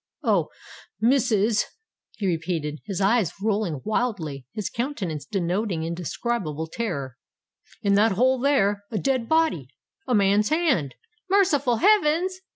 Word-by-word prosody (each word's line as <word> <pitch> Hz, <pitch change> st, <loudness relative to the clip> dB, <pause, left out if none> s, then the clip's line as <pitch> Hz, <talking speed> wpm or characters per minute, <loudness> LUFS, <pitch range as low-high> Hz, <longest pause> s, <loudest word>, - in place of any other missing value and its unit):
"Oh! -, -, +2 dB, 0.5 s
missus," 225 Hz, -3 st, +3 dB, 0.5 s
he 205 Hz, -, -3 dB
repeated, 165 Hz, -4 st, -2 dB
his 195 Hz, -3 st, -4 dB
eyes 200 Hz, -2 st, +2 dB
rolling 200 Hz, -8 st, -1 dB
wildly, 210 Hz, -, -1 dB, 0.2 s
and -, -, -4 dB
his 210 Hz, -, -2 dB
countenance 215 Hz, -, -3 dB
denoting 185 Hz, -2 st, -1 dB
indescribable 170 Hz, -1 st, -3 dB
terror; 155 Hz, -, -4 dB, 0.7 s
"in 200 Hz, -, +3 dB
that 210 Hz, +1 st, +4 dB
hole 255 Hz, +5 st, +2 dB
there—a 210 Hz, -6 st, +1 dB
dead 260 Hz, -1 st, 0 dB
body—a 320 Hz, -2 st, -1 dB
man's 205 Hz, +1 st, +3 dB
hand——" 285 Hz, -, +1 dB, 0.3 s
"Merciful 300 Hz, -11 st, +3 dB
heavens!" 370 Hz, -, +3 dB
210 Hz, 115 wpm, -24 LUFS, 175-260 Hz, 0.7 s, that